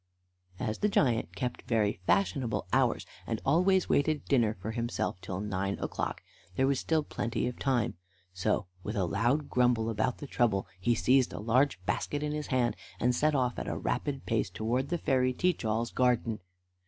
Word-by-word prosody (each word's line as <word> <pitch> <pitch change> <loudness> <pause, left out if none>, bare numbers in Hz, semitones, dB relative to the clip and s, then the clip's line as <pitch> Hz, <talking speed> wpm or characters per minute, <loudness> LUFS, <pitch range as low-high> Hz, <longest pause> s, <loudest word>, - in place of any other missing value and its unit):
As 110 -3 -2
the 210 - +2
giant 125 - +1
kept 125 -2 -3
very 110 -4 +1
fashionable 100 +4 +1
hours, - - +2 0.2
and 115 -1 -1
always 180 +6 +3
waited 150 +1 +1
dinner 115 -6 +2
for 110 +4 -4
himself 115 -5 -2
till 95 0 -4
nine 100 -1 -2
o'clock, - - -3 0.3
there 130 - +3
was 135 -1 +2
still 160 -2 +1
plenty 120 -4 -2
of 125 0 -4
time; 120 -5 +1 0.4
so, 90 +1 0 0.2
with 105 +4 -4
a 95 -3 +1
loud 120 - +1
grumble 120 -2 +2
about 110 +3 0
the - - -7
trouble, 115 -8 +1
he 120 +6 +2
seized 130 +3 +3
a - - -5
large 120 +1 +2
basket 145 +8 -1
in 150 - -1
his 150 0 -3
hand, 125 -3 +1 0.2
and 125 +1 +2
set 150 +4 +2
off 125 -3 0
at - - -5
a - - -2
rapid 140 -2 -2
pace 115 -1 0
towards 125 +5 -1
the 175 - 0
fairy 130 -4 +2
Teach 180 +3 0
all's 115 +2 0
garden. 120 -3 +1
120 Hz, 180 wpm, -30 LUFS, 110-135 Hz, 0.4 s, always